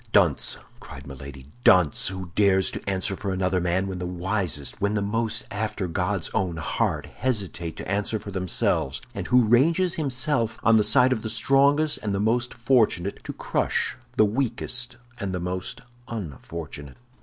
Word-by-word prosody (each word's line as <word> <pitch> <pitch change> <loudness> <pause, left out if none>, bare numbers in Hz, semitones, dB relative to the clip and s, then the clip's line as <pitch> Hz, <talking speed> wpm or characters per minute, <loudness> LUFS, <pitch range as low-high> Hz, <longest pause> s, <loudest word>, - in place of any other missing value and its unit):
"Dunce," - - +3 0.2
cried 65 0 -11
Milady, 70 0 -9 0.2
"dunce! 90 -5 +5
who 95 -2 -5
dares 95 -1 +3
to - - -5
answer 95 +1 -1
for 100 0 -3
another 95 -1 0
man, 90 +2 +1
when 95 -2 -4
the 90 - -3
wisest, 90 - -2
when 100 +1 +1
those 105 - 0
most 115 +2 -1
after 105 -2 -2
God's 90 +1 -1
own 90 -4 -1
heart, 80 - -1
hesitate 100 -9 -3
to - - -6
answer 105 +3 -1
for 100 -1 -8
themselves, 90 - 0
and - - -5
who 125 0 +5
ranges 165 - +3
himself 130 -5 0
on 115 -1 +6
the 105 - +4
side 125 +5 +6
of 110 - -3
the 110 - -4
strongest 140 +6 +3
and 100 -2 -1
the - - -1
most 120 +4 +1
fortunate, 115 -6 +1
to - - -4
crush - - -1 0.2
the 110 - +6
weakest 125 +1 -2 0.2
and 95 -4 -3
the - - -2
most 90 +1 -4 0.3
unfortunate." 80 - -7
100 Hz, 165 wpm, -25 LUFS, 90-115 Hz, 0.3 s, on